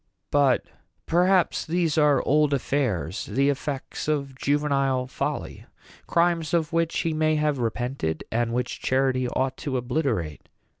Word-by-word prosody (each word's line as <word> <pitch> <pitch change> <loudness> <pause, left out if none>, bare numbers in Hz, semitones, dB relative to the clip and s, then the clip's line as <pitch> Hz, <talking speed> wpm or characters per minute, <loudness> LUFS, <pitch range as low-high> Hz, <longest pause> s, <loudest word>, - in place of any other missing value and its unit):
But 140 -3 +3 0.4
perhaps 180 0 +2
these 165 -2 0
are 150 -2 +3
old 150 0 +3
affairs 115 - -1
the 140 +2 +2
effects 140 0 -4
of 140 -3 -1
juvenile 140 -1 +1
folly 130 - -4 0.4
crimes 170 -1 +1
of 165 -1 0
which 165 0 +1
he 165 - -1
may 155 0 +2
have 150 -2 0
repented, 120 - -2
and 115 0 0
which 125 +1 -3
charity 130 -1 +1
ought 130 +1 -1
to 135 -3 -2
obliterate." 120 - -2
140 Hz, 135 wpm, -25 LUFS, 125-155 Hz, 0.4 s, But